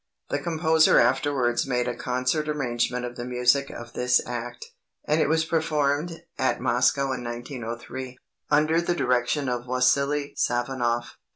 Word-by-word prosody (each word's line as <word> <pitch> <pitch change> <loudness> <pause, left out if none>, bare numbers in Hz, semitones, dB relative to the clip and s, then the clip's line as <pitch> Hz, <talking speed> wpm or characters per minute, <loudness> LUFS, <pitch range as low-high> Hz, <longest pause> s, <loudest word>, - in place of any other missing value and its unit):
The 145 - -1
composer 160 0 +3
afterwards 125 0 +1
made 125 -1 0
a 125 - -1
concert 130 +5 -1
arrangement 125 -3 -1
of 120 0 -7
the 120 - -4
music 125 +3 +2
of 120 -1 -9
this 125 0 +3
act, 120 0 -6 0.4
and 155 +1 +2
it - - +2
was 160 0 +2
performed 160 0 0 0.2
at 130 - +1
Moscow 130 +2 +2
in 130 -1 -4
1903, 120 +1 -6 0.3
under 155 +3 +3
the 175 0 -1
direction 125 +1 +1
of 125 0 -3
Wassily 140 +3 +1
Safonoff. 120 -1 -1
130 Hz, 145 wpm, -25 LUFS, 120-145 Hz, 0.4 s, composer